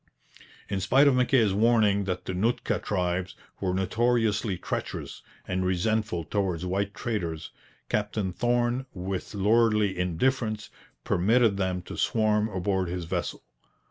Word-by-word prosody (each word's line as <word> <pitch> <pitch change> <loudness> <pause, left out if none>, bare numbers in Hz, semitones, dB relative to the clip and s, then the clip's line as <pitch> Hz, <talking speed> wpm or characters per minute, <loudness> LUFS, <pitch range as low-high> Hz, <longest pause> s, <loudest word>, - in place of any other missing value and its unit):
In 100 - -2
spite 135 +9 +4
of 140 - +5
Mackay's 125 -5 +3
warning 105 -2 +3
that 90 -1 -3
the 95 - -3
Nootka 110 +7 0
tribes 90 -1 -2 0.2
were 95 -2 0
notoriously 105 +1 +1
treacherous - - -5 0.3
and 95 0 -1
resentful 95 0 0
towards 90 -1 -1
white 100 +2 -2
traders, 85 - -3 0.4
Captain 105 -2 -1
Thorn 120 +3 0
with 95 +3 -4
lordly 105 0 +3
indifference 110 +5 -1 0.3
permitted 110 +3 +3
them 95 -2 -1
to - - -8
swarm 110 0 +2
aboard 95 -1 -1
his 90 0 -3
vessel. - - -3
100 Hz, 125 wpm, -27 LUFS, 90-115 Hz, 0.4 s, of